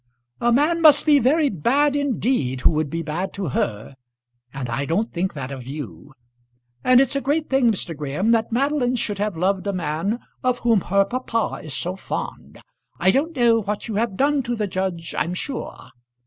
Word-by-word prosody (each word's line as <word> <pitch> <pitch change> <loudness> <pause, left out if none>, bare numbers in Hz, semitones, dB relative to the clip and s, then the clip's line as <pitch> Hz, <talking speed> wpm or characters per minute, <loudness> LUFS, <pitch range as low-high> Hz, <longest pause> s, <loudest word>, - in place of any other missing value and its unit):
"A 240 - +2
man 305 +7 +2
must 300 -3 +7
be 295 -2 +6
very 290 +5 +3
bad 275 - +2
indeed 245 - 0
who - - +4
would 155 -2 -1
be 165 +2 -3
bad 170 +5 -3
to 195 -6 -3
her, 110 0 -2 0.6
and 135 -2 -5
I 120 +4 -2
don't 195 +10 -1
think 185 +1 -2
that 135 -2 -5
of 130 -3 -8
you. 135 - -8 0.7
And 255 0 +6
it's 270 +1 +2
a 275 - 0
great 295 +3 -1
thing, 265 -3 +4
Mr. 175 -5 -3
Graham, 150 +9 -1
that 225 0 +1
Madeline 255 0 +1
should 205 -4 -2
have 205 -4 -1
loved 190 +3 0
a 200 - 0
man 175 +5 -1 0.3
of 250 -1 +2
whom 225 -4 +4
her 195 +3 +2
papa 235 0 -2
is 150 -4 -6
so 180 +5 -2
fond. 190 - -6 0.4
I 190 - +4
don't 310 +9 0
know 235 -3 +4
what 210 +2 -4
you 225 - -4
have 220 -3 -1
done 285 +1 +2
to 240 -1 -3
the 215 -2 -1
judge, 185 -3 -3
I'm 175 +2 -1
sure." 265 +7 -5
210 Hz, 195 wpm, -22 LUFS, 165-255 Hz, 0.7 s, must